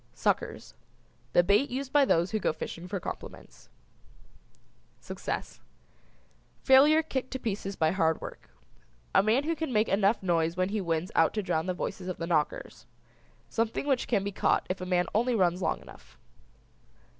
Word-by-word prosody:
SUCKERS. - - -1 0.6
The 175 - +6
bait 205 +9 +3
used 265 +1 -4
by 290 -1 +6
those 170 -6 +2
who 215 - 0
go - - +1
fishing 170 +2 -7
for 195 +1 -3
compliments. - - -9 1.3
SUCCESS. - - -5 1.0
Failure 290 +4 +6
kicked 260 -4 -3
to - - -1
pieces 200 -4 -3
by 160 -2 +2
hard 160 -4 +1
work. - - -10 0.6
A - - +6
man 220 +7 +2
who 330 +2 -1
can 320 -4 -3
make 215 -1 +2
enough 200 +2 +2
noise 165 -1 +1
when 185 +1 +1
he 210 0 -1
wins 165 0 -2
out 165 +5 +3
to 210 - -1
drown 160 -1 -1
the 185 - -1
voices 180 +1 -5
of 185 - -4
the 165 - -4
knockers. 155 -7 -2 0.6
Something 225 - -1
which 270 -3 0
can 205 -5 +1
be 200 - -3
caught - - +1
if 185 - -4
a 185 - -4
man 180 -1 +2
only 240 +3 +2
runs 180 -3 +2
long 160 - -1
enough. 65 -3 -16
195 Hz, 170 wpm, -29 LUFS, 175-240 Hz, 1.3 s, The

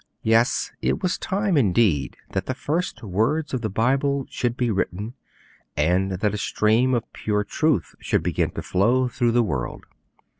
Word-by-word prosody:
Yes; 115 +3 +2
it - - 0
was 180 -1 0
time, 195 -1 0
indeed, 100 - +2
that 95 -1 -2
the 130 - -2
first 155 +5 -2
words 115 - 0
of 130 - -1
the 110 - -2
Bible 135 +6 +1
should 120 0 -1
be 120 -2 +1
written, 100 +3 -2 0.6
and 90 +6 +2
that 105 +3 0
a 105 - -3
stream 115 +6 +2
of 115 -1 -4
pure 105 -1 -1
truth 145 - 0
should - - 0
begin - - 0
to - - -5
flow 120 +7 +2
through 120 -1 0
the 120 0 +4
world. 70 - -3
115 Hz, 165 wpm, -23 LUFS, 100-130 Hz, 0.6 s, the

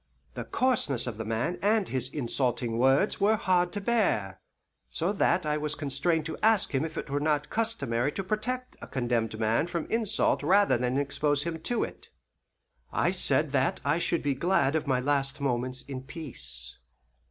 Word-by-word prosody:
The - - -5
coarseness 235 - +1
of 120 -4 -4
the 110 - -3
man 115 +10 -1
and 210 0 +2
his 130 -1 -2
insulting 120 -4 -1
words 135 - +3
were 210 +2 +4
hard 180 -3 +1
to 205 - -2
bear, 185 - 0 0.5
so 175 +5 0
that 180 -3 +2
I 150 0 0
was 150 0 -2
constrained 150 +3 0
to 160 - -5
ask 220 -6 +3
him 135 +1 +1
if 160 -1 -5
it - - -5
were 145 - +1
not 145 -1 0
customary 145 - 0
to 195 - -3
protect 250 +6 -3
a - - -8
condemned 120 -4 -1
man 115 +8 +1
from 170 -2 -3
insult 225 -2 +1
rather 195 +7 +4
than 125 +1 0
to 140 - +2
expose 145 0 0
him 165 0 -4
to 235 +9 -1
it. - - -7 0.8
I 175 - +1
said 150 -5 +2
that 135 -1 +1
I 145 +4 +2
should 170 -1 0
be 145 -1 +1
glad 155 -1 +1
of 155 -1 -1
my 130 -2 +2
last 135 +1 0
moments 130 -1 -1
in 135 -2 -6
peace. 130 - -8
145 Hz, 185 wpm, -28 LUFS, 130-180 Hz, 0.8 s, were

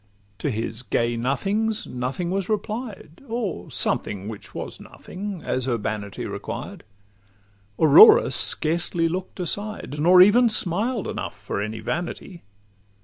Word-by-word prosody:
To - - -1
his 115 -1 -4
gay 120 -1 -1
nothings, 200 - -1
nothing 130 +8 -4
was 195 0 -2
replied, 215 - -5
Or 225 -6 -4
something 100 0 -1
which 110 -2 -8
was - - -6
nothing, 195 -2 -8
as 130 0 -2
urbanity 105 -4 -3
Required. - - -7 0.9
Aurora 435 - +8
scarcely 165 +1 +2
look'd 185 +3 -5
aside, 195 -4 -4
Nor 180 +4 +6
even 235 +5 +5
smiled 215 +3 +1
enough 95 - -5
for 100 0 -4
any 110 +1 -5
vanity. 175 - -5
175 Hz, 120 wpm, -23 LUFS, 125-210 Hz, 0.9 s, Aurora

